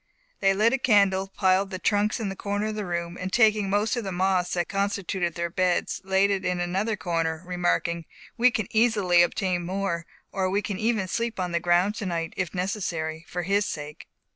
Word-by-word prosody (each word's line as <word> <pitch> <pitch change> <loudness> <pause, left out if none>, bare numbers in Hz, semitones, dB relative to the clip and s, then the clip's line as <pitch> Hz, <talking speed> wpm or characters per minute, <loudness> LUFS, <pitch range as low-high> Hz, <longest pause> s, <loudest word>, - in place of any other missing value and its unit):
They 195 -1 +3
lit 220 +5 +3
a 265 - +1
candle, 200 -5 +3
piled 195 0 +2
the 190 - -4
trunks 205 +4 +1
in 210 -4 -2
a - - -6
corner 205 +2 -2
of - - -3
the 210 -3 -4
room, 170 0 -3
and 185 +1 -3
taking 215 -2 +3
most 205 +4 +1
of 240 - -3
the 195 - -4
moss 185 0 +1
that 175 -2 0
constituted 195 -3 -1
their 170 -1 -2
beds, 180 0 0
laid 190 +1 +2
it 195 -1 -1
in 180 -1 -1
another 190 +5 -1
corner, 165 -3 -2
remarking, 175 -1 -1 0.3
"We 245 +2 +5
can 220 -4 -2
easily 210 -6 +4
obtain 175 0 0
more; 180 -2 -2 0.2
or 190 -1 0
we 200 +2 0
can 200 -3 -4
even 220 -3 0
sleep 230 +2 -2
on 180 -1 -2
the 170 - +1
ground 175 +4 +2
tonight, 170 -6 -3
if 180 -4 -2
necessary, 175 -4 -3
for 180 0 -4
his 200 +3 +1
sake." 150 0 -7
190 Hz, 200 wpm, -26 LUFS, 175-205 Hz, 0.3 s, We